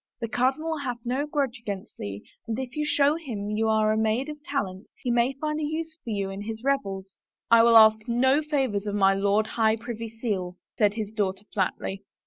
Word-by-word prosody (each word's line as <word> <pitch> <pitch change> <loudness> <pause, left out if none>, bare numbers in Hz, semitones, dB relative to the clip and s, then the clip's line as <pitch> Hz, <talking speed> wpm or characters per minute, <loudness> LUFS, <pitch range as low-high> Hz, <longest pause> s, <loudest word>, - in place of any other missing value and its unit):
The 230 - -2
cardinal 270 +7 0
hath 250 -4 -3
no 260 +5 -1
grudge 280 -4 -1
against 200 -4 -6
thee 100 0 -6 0.2
and 225 -1 -2
if 255 -1 -5
you 300 - 0
show 295 0 +3
him 215 -10 -5
you 220 +1 +1
are 215 0 +3
a 215 - +1
maid 220 +6 0
of 300 -1 -8
talent 200 -10 -3
he 245 - -2
may 240 +2 +2
find 300 +3 -3
a - - -2
use 315 +1 -3
for 240 - -7
you 200 -3 -2
in 195 +1 -6
his 220 +2 -6
revels." 195 -9 -2 0.2
" - - -46
I 230 0 +8
will 230 0 +7
ask 220 0 +6
no 260 +5 +3
favors 265 -9 -1
of 205 - -2
my 195 -1 +4
Lord 200 +2 +2
High 220 0 +2
Privy 230 0 -6
Seal," 205 -6 -3 0.2
said 210 -2 +2
his 215 -2 -4
daughter 200 -2 -1
flatly. 195 0 -2
225 Hz, 215 wpm, -26 LUFS, 205-270 Hz, 0.2 s, I